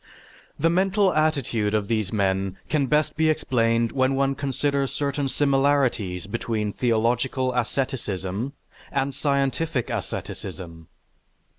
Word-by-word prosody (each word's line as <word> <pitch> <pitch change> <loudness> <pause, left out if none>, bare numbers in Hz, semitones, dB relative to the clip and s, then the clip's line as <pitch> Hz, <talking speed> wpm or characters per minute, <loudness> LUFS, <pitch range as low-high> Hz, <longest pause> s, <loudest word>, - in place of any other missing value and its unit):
The 165 - +2
mental 190 +1 +3
attitude 130 -9 +1
of 105 -2 0
these 110 -4 0
men 95 -2 0
can 145 -3 +1
best 150 +2 +1
be 160 0 +3
explained 115 -6 +1
when 130 0 +2
one 135 0 +2
considers 140 0 -1
certain 140 -1 -1
similarities 135 - +1
between 105 0 -2
theological 125 +2 +1
asceticism 120 - -2 0.4
and 135 0 0
scientific 140 -1 0
asceticism. 85 -3 -6
130 Hz, 110 wpm, -24 LUFS, 110-140 Hz, 0.4 s, mental